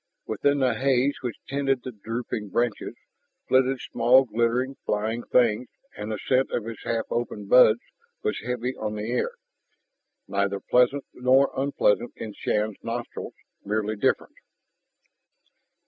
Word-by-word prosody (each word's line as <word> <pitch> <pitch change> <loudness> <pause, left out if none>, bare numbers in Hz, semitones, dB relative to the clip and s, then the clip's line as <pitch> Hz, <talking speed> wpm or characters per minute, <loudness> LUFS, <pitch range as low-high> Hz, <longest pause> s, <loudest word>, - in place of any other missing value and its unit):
Within 140 0 +1
the 130 -2 +3
haze 135 +3 +2
which 125 -4 -4
tented 135 -2 0
the 130 - -5
drooping 110 -1 -5
branches, 120 +1 -1 0.5
flitted 130 0 +3
small 120 +3 +4
glittering, 120 +4 0
flying 110 +3 -1
things; 120 0 +2 0.3
and 105 +1 -5
the 110 - -2
scent 130 +5 +1
of 115 - -2
its 115 -1 -7
half 115 -1 -1
open 115 -3 -2
buds 115 +1 +6 0.4
was 435 - -1
heavy 125 +1 -2
on 105 -1 -4
the 105 +2 -4
air, 125 - 0 0.9
neither 100 0 0
pleasant 125 +5 +2
nor 130 +2 +3
unpleasant 130 -4 +1
in 110 -2 -7
Shann's 105 0 -1
nostrils, 120 +1 -5 0.3
merely 105 +1 -1
different. 105 - 0
120 Hz, 130 wpm, -26 LUFS, 110-130 Hz, 0.9 s, buds